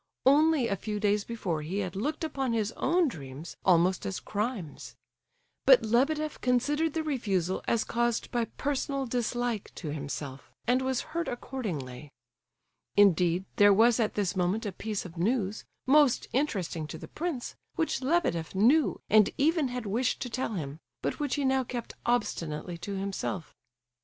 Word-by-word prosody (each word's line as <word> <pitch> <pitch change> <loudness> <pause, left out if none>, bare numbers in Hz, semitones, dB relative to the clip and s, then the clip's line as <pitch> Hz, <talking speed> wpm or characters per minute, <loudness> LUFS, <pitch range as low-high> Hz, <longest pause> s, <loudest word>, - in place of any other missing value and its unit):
Only 295 -1 +5
a 200 - 0
few 210 +2 -4
days 205 0 +2
before 190 -9 -3
he 165 +6 -4
had 185 -3 -2
looked 295 - -2
upon 270 -5 -1
his 220 -1 0
own 340 +7 +2
dreams 145 - -7
almost 180 0 +4
as 195 - -3
crimes. 210 - -4 0.7
But - - +7
Lebedeff 300 +7 +1
considered 290 +6 +1
the 320 - 0
refusal 195 - -1
as 230 -1 +2
caused 240 -1 -1
by 240 -1 +1
personal 275 +1 -2
dislike 240 -2 -2
to 160 - -5
himself, 145 -2 -5 0.2
and 250 +2 +3
was 260 -1 0
hurt 335 -1 -1
accordingly. 155 - -5 0.9
Indeed, 180 -2 +4
there 205 0 +7
was 230 +4 +5
at 220 -2 +1
this 200 -2 0
moment 185 +5 0
a 205 - -2
piece 210 +2 -4
of 175 -1 -10
news, 210 +2 0 0.2
most 280 -1 +4
interesting 190 - -1
to - - -7
the - - -9
prince, 320 -7 -4 0.2
which 325 -5 0
Lebedeff 260 - 0
knew 260 +11 +4
and 215 -1 +6
even 310 0 +3
had 250 -2 -4
wished 235 +6 0
to 245 - -6
tell 255 -1 -2
him, 150 -3 -5 0.2
but - - -2
which 290 -3 0
he 285 -2 0
now 265 0 +3
kept 240 -1 -5
obstinately 170 -8 -1
to 200 +3 -5
himself. 195 -3 -3
225 Hz, 160 wpm, -29 LUFS, 185-265 Hz, 0.9 s, But